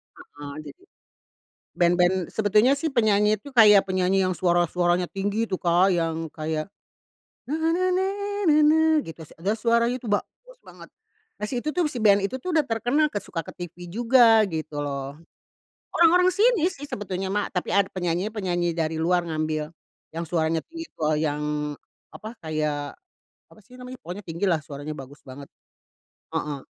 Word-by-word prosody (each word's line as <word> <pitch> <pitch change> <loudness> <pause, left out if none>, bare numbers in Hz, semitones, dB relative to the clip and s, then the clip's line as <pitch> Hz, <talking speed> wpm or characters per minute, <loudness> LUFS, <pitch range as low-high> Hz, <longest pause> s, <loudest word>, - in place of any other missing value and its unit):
heeh, 145 -1 -11
jadi 365 - -12 0.9
band 175 0 +3
band, 180 +1 +3
sebetulnya 220 +6 +3
sih 315 -2 -3
penyanyi 210 -3 +2
itu 285 - -11
kayak 210 -6 +7
penyanyi 185 +1 +2
yang 185 -1 -1
suara-suaranya 175 0 +1
tinggi 205 +3 -2
itu 185 - -1
Kak 175 +2 +3
yang 165 -1 -2
kayak, 155 +2 -4 0.8
na, 300 - 0
na, 320 0 0 0.2
na, 375 +1 +1 0.4
na, 305 - +5
na, 305 +1 +5 0.2
gitu 160 -1 -10
s - - -18
terus 210 +4 0
suaranya 235 +2 +2
itu 240 - -11
bagus - - -4
banget. - - -13 0.6
Nah - - 0
si 250 - -2
itu 305 +5 -3
tuh 360 - +2
si 245 - -5
band 205 -2 +4
itu 200 +7 -2
tuh 345 +6 -4
udah 310 - +4
terkenal 270 +5 0
ke 205 - -2
suka 165 -4 -6
ke - - -10 0.2
TV 175 +1 -12
juga 230 0 +5
gitu 155 -4 -5
loh. 140 0 -4 0.8
Orang-orang 355 +2 +5
sini 400 -1 +3
sih 290 -5 -9
sebetulnya 195 -6 -4
mah 205 0 -1
tapi 180 - -3
ada 200 0 +3
penyanyi 180 +1 -2
penyanyi 175 -5 -2
dari 160 -1 -1
luar 175 +1 +1
ngambil 155 -1 -3 0.4
yang 165 +1 -5
suaranya 160 -1 -1
tipe 330 - -7 0.2
yang 150 -1 -2 0.3
apa 220 +2 -9
kayak, 150 -2 -3 0.5
apa - - -20
sih 245 - -23
namanya 250 +1 -8
pokoknya 180 +4 -6
tinggi 170 0 -5
lah 170 -5 +2
suaranya 145 +1 -7
bagus 140 0 -11
banget. 140 +1 -11 0.9
Heeh, 145 -2 -2
185 Hz, 165 wpm, -24 LUFS, 160-235 Hz, 0.9 s, kayak